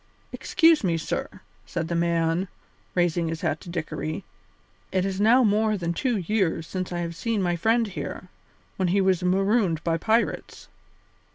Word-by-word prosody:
"Excuse 330 -5 +3
me, 170 -3 +1
sir," 155 - -3 0.4
said 165 -1 -3
the 170 - -3
man, 170 +1 +1 0.5
raising 175 -1 +1
his 160 -1 -4
hat 155 -3 -1
to - - -10
Dickory, 165 0 -4 0.7
"it 185 0 +1
is 195 0 -2
now 240 +5 +5
more 215 0 +2
than 170 -2 -2
two 240 +6 0
years 185 -3 0
since 185 +2 -4
I 175 0 -2
have 170 0 -4
seen 225 +4 -1
my 175 -2 +1
friend 225 +7 +2
here, 190 -2 -6 0.5
when 185 - +1
he 190 +3 +2
was 190 -2 +2
marooned 190 -2 +1
by 165 -1 +1
pirates. 225 +6 -1
180 Hz, 165 wpm, -25 LUFS, 170-210 Hz, 0.7 s, now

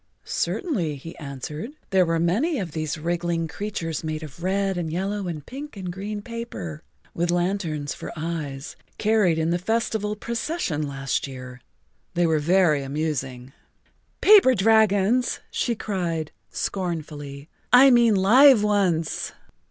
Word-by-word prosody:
"Certainly," 190 - -1
he 165 +5 -9
answered. 150 - -6 0.2
"There 185 -2 +4
were 165 0 +1
many 225 - +1
of 185 -8 -3
these 155 0 -3
wriggling 170 +1 -1
creatures 165 -3 -4
made 155 0 -3
of 155 +3 -10
red 195 +1 0
and 170 -3 -3
yellow 195 +3 -2
and 155 -4 -5
pink 280 -1 -8
and 180 -2 -5
green 205 +2 -5
paper, 230 - -6 0.3
with 175 +1 -1
lanterns 175 -5 -1
for - - -7
eyes, 155 -4 -4 0.2
carried 210 -6 +3
in 160 +1 +1
the 175 - +1
festival 220 +1 -1
procession 230 - -2
last 135 0 -2
year. 125 -2 -9 0.5
They 175 0 +3
were 160 -2 +2
very 165 -2 +3
amusing." 135 -3 -3 0.7
"Paper 395 -12 +7
dragons," 220 +2 +3
she 235 - 0
cried 170 -7 -3 0.2
scornfully. 150 -6 -4 0.2
"I 260 +2 +8
mean 235 -3 +5
live 230 +5 +7
ones." 185 -6 0
175 Hz, 135 wpm, -24 LUFS, 155-210 Hz, 0.7 s, I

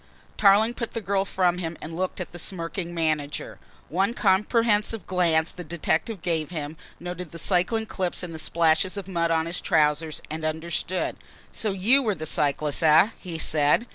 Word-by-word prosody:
Tarling 210 +3 +5
put 235 -1 -5
the 230 - -2
girl 200 -2 0
from 180 -2 +1
him 165 -2 -4
and 160 +1 -7
looked 185 +2 -2
at 180 - -5
the 175 - -7
smirking 170 0 -3
manager. 155 -4 -2 0.3
One 195 +8 0
comprehensive 210 0 +2
glance 170 -3 +1
the 180 - -8
detective 170 +4 -2
gave 160 -3 -1
him, 155 -3 -5 0.2
noted 175 -2 -6
the 170 - -8
cycling 190 +6 +1
clips 185 -4 -2
and 175 -2 -6
the 160 - -4
splashes 165 +4 +2
of 195 -2 -5
mud 170 -3 0
on 160 -1 +1
his 170 +1 -3
trousers, 150 0 +1
and 155 +1 -6
understood. 165 +3 -2 0.3
"So 215 - -1
you 215 +9 +3
were 215 -6 0
the 155 - -6
cyclist, 145 -1 +2
eh?" 160 +5 +6
he 175 -4 -6
said. 155 +7 +2
175 Hz, 175 wpm, -25 LUFS, 160-195 Hz, 0.3 s, eh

